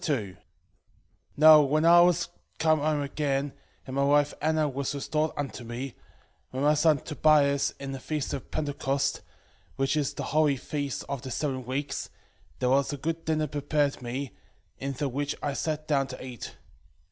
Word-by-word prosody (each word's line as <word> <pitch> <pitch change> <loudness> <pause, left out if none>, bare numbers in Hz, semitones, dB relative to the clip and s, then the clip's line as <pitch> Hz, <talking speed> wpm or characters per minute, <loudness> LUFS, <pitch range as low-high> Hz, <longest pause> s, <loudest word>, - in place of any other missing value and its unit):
2:1 110 - -2 1.0
Now 155 0 +9
when 150 +3 +2
I 170 +1 +8
was 175 0 +3 0.3
come 155 -1 +3
home 150 0 +1
again, 140 -1 -1 0.3
and 130 - -6
my 140 - +2
wife 145 +1 +3
Anna 155 0 +2
was 140 0 -3
restored 155 +2 0
unto 135 -3 -4
me, 120 +3 -5 0.6
with 130 +2 -3
my 150 +1 +5
son 155 0 +4
Tobias, 145 -2 +3
in 140 -1 -5
the 135 - -5
feast 150 +1 -3
of 135 - -6
Pentecost, 140 -2 -1 0.5
which 135 +2 0
is 145 -3 -1
the - - -4
holy 150 -3 +3
feast 140 0 -4
of 140 -2 -4
the 130 - -7
seven 130 -1 -2
weeks, 135 +1 -3 0.5
there 125 - 0
was 140 +2 +3
a 145 - -4
good 165 +4 -3
dinner 155 -1 +1
prepared 145 -1 -1
me, 125 +1 -4 0.5
in 140 +1 -3
the 140 +2 -2
which 140 +2 -2
I 145 - -1
sat 155 +1 -3
down 140 -3 +2
to - - -8
eat. 125 -3 -8
145 Hz, 170 wpm, -28 LUFS, 135-155 Hz, 1.0 s, Now